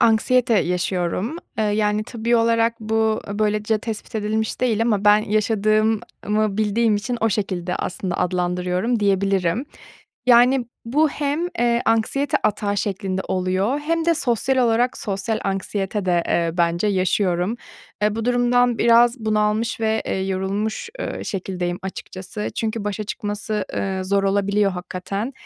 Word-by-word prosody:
anksiyete 235 0 +3
yaşıyorum. 180 - -1 0.2
Eee, 220 - +2
yani, 210 0 +1
tıbbi 235 +1 0
olarak 230 0 +2
bu 220 0 +1
böylece 215 +1 0
tespit 225 +1 -6
edilmiş 220 0 -1
değil 230 -3 +2
ama 210 -3 +1
ben 210 0 +7
yaşadığımı 215 -1 0
bildiğim 215 +1 +2
için 240 +4 -3
o 225 - +3
şekilde 185 -4 -2
aslında 180 -1 -3
adlandırıyorum 180 +5 0
diyebilirim. 195 +1 +1 0.6
Yani, 245 +1 +5 0.2
bu 295 +7 +2
hem, 290 +1 -2 0.2
eee, 240 0 +2
anksiyete 230 +5 +1
atağı 205 -1 0
şeklinde 190 -1 -2
oluyor 185 +8 0
hem 325 +2 -1
de 335 0 +3
sosyal 260 -2 0
olarak 240 0 +2
sosyal 210 +2 -2
anksiyete 195 +1 -2
de, 175 -2 +2
eee, 170 -1 +1
bence 170 +3 +2
yaşıyorum. 185 +1 +1 0.5
Eee, 210 0 +2
bu 225 0 -3
durumdan 245 -1 +2
biraz 235 +2 +5
bunalmış 215 +1 0
ve, 220 0 +1
eee, 190 - -1
yorulmuş, 200 - -2
eee, - - -4
şekildeyim 180 -2 -3
açıkçası. 190 +2 -6
Çünkü 220 -1 -2
başa 210 +1 -3
çıkması, 210 +1 -3
eee, 190 -1 -2
zor 195 +1 +1
olabiliyor 200 +1 +2
hakikaten. 190 +6 -4
215 Hz, 135 wpm, -22 LUFS, 195-230 Hz, 0.6 s, ben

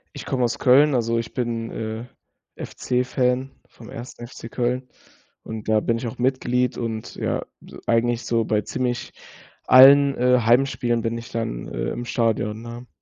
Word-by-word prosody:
Ich - - -7
komme 125 -2 -1
aus 120 - -1
Köln, 140 +3 +5
also 115 -1 +1
ich 115 - -5
bin, 115 -2 -2
äh, 110 +2 -5 0.6
FC-Fan 125 +1 -1 0.2
vom 115 - -14
1. 120 +2 -9
FC 115 -1 -10
Köln. 125 +1 -2 0.5
Und 110 -1 -8
da 110 -1 +3
bin 115 +1 0
ich 120 - -5
auch 125 +2 -6
Mitglied 125 -1 0
und 110 -2 -4
ja, - - -2 0.2
e - - -13
eigentlich 120 +1 +1
so 115 -1 +1
bei 105 -1 0
ziemlich 125 0 -3 0.5
allen, 140 +2 +8
äh, 125 0 +3
Heimspielen 120 0 +2
bin 115 0 -2
ich 115 - -10
dann, 85 - -4
äh, - - -3
im 120 - -5
Stadion, 115 -2 -1
ne? 120 +1 -9
120 Hz, 165 wpm, -23 LUFS, 115-125 Hz, 0.6 s, allen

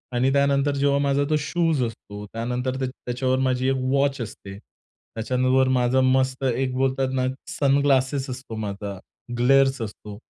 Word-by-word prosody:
आणि 130 +2 +2
त्यानंतर 140 0 +2
जेव्हा 140 0 +2
माझा 140 0 +2
तो 155 - +2
शूज 160 -2 0
असतो, 105 -3 -7
त्यानंतर 125 +4 -3
त्या 130 - -1
त्याच्यावर 130 +1 -2
माझी 130 0 +1
एक 135 - +1 0.2
वॉच 140 0 +1
असते, 100 -3 -8
त्याच्यानंतर 130 +4 -2
माझा 130 0 +2
मस्त 130 0 +1
एक 130 +1 -1
बोलतात 130 0 0
ना, 130 -1 0 0.2
सनग्लासेस 140 -1 +1
असतो 130 -3 -7
माझा, 100 -2 -5 0.4
ग्लेर्स 135 +1 +3
असतो, 105 -1 -7
130 Hz, 145 wpm, -24 LUFS, 120-135 Hz, 0.4 s, ग्लेर्स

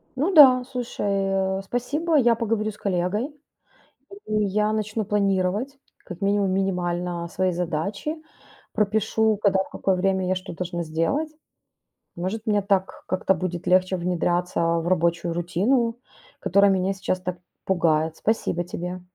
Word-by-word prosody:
Ну 300 +9 0
да. 260 -5 +8
Слушай, 245 -4 -5
а, 195 -1 0
э, - - -5
спасибо. 285 - -1
Я 240 -3 +4
поговорю 220 -1 -1
с 210 - -16
коллегой, 190 +4 -1 1.0
и 215 -1 +1
я 210 +2 +1
начну 215 0 -2
планировать 200 +5 0 0.3
как 180 +2 -9
минимум 200 -1 +1
минимально 180 -2 -1
свои 185 +1 0
задачи. 180 - -3 0.6
Пропишу, 215 +1 +1
когда, 195 -1 +3
в - - -16
какое 190 -1 0
время 190 0 +1
я 185 - +2
что 185 +1 -6
должна 175 0 -4
сделать. 165 - -1 0.9
Может, 205 +6 -4
мне 205 -2 +2
так 195 -1 -1
как-то 185 +1 +1
будет 180 -1 -4
легче 185 +1 +3
внедряться 175 0 -1
в 165 0 +1
рабочую 170 -1 +1
рутину, 230 +8 0 0.4
которая 200 +2 +4
меня 190 0 +1
сейчас 185 -1 -2
так 180 -1 -4 0.3
пугает. 160 -3 +1
Спасибо 205 -5 0
тебе. 180 +1 -5
190 Hz, 140 wpm, -24 LUFS, 180-215 Hz, 1.0 s, да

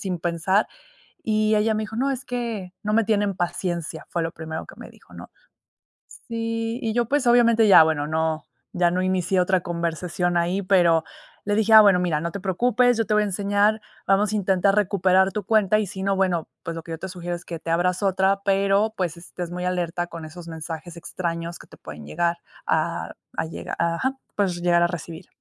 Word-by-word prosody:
sin 185 -3 -3
pensar 175 +4 +1 0.6
y 215 0 +1
ella 220 +1 +2
me 215 - -1
dijo: 220 - -9
"No, 275 +3 +1
es 260 -1 -4
que 230 -7 -4
no 210 0 -2
me 225 0 +3
tienen 205 -3 0
paciencia", 175 -3 -3
fue 170 - -1
lo 165 0 -3
primero 160 0 -6
que - - -12
me - - -11
dijo, - - -19
¿no? - - -10 1.0
Sí, 230 +1 -2
y 220 -1 -1
yo, 240 +1 +1
pues 280 +3 0
obviamente 235 -2 +5
ya, 175 -5 +9
bueno, 150 -2 -1
no, 160 -1 -1 0.3
ya 175 -1 +2
no 180 - 0
inicié 185 0 +1
otra 185 0 +2
conversación 175 +1 -2
ahí, 175 +3 +1
pero 175 -4 +3 0.4
le 205 0 0
dije: 220 +1 +2
"Ah, 220 -1 +11
bueno, 195 -3 +5
mira, 170 -4 0
no 170 +1 -3
te 200 - -5
preocupes, 245 +6 +2
yo 225 - 0
te 210 - +1
voy 210 - +4
a 210 - 0
enseñar, 205 +2 +1 0.3
vamos 200 +2 +3
a - - +1
intentar 195 0 +2
recuperar 190 -2 +3
tu 205 +1 -4
cuenta 215 0 +3
y 215 - 0
si 190 0 -7
no, 195 0 +1
bueno, 180 -4 0 0.2
pues, 165 - -4
lo 165 - -6
que 165 - -12
yo 160 - -4
te 190 - -6
sugiero 175 -1 -5
es 170 - -12
que 165 -2 -7
te 165 - -5
abras 180 +3 +1
otra, 195 0 +2
pero, 200 +2 +2
pues 175 -3 -2
estés 175 0 -7
muy 180 0 -4
alerta 175 -1 -2
con 170 -2 -8
esos 170 +2 -10
mensajes 160 +1 -7
extraños 170 0 -5
que - - -14
te - - -15
pueden 75 -1 -10
llegar 170 - -1 0.3
a - - -1 0.2
a - - 0
llegar, 160 - -6
ajá, 170 +12 -1 0.2
puedes 185 -4 0
llegar 175 0 +3
a 175 - +3
recibir" 170 0 -7
185 Hz, 215 wpm, -23 LUFS, 170-210 Hz, 1.0 s, Ah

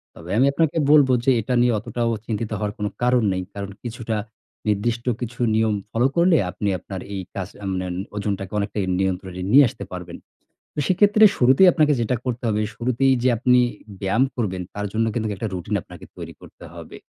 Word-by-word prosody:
তবে 85 +2 -11
আমি 130 - +5
আপনাকে 160 +1 +1
বলব 145 -3 +6 0.2
যে, 135 - +5
এটা 125 +4 -3
নিয়ে 120 -1 +3
অতটাও 115 +2 -2
চিন্তিত 110 0 -3
হওয়ার 105 0 -3
কোনো 105 -1 -2
কারণ 125 -1 +3
নেই। 95 0 -2
কারণ, 100 -1 -5
কিছুটা 115 -2 -4 0.5
নির্দিষ্ট 115 +3 0 0.2
কিছু 120 +1 -6 0.2
নিয়ম 110 -1 +2 0.2
ফলো 120 +3 +2
করলে, 170 -1 +4
আপনি 100 +3 -4
আপনার 95 -2 -7
এই 95 - -3
কাজ 95 -2 -3 0.2
মানে 95 0 -2
ওণ 90 - -4 0.2
ওজনটাকে 100 -1 -3
অনেকটাই 100 -1 -2
নিয়ন্ত্রণে 95 -1 -2
নিয়ে 140 +1 +8
আসতে - - -9
পারবেন। 90 -1 -7 0.6
তো, - - -11
সেক্ষেত্রে 205 +3 +5
শুরুতেই 135 +9 +6
আপনাকে 155 -3 +3
যেটা 120 +2 0
করতে 125 -1 -3
হবে, 105 -1 0 0.2
শুরুতেই 125 +2 +2
যে 130 - +3
আপনি 125 +1 +3 0.4
ব্যায়াম 105 +7 +2
করবেন, 95 -6 -2
তার 105 0 -3
জন্য 115 +1 +1
কিন্তুক 110 -2 -1
একটা 110 +3 -3
রুটিন 90 -2 -4
আপনাকে - - -13
তৈরি - - -8
করতে - - -15
হবে। - - -10
115 Hz, 185 wpm, -22 LUFS, 100-125 Hz, 0.6 s, নিয়ে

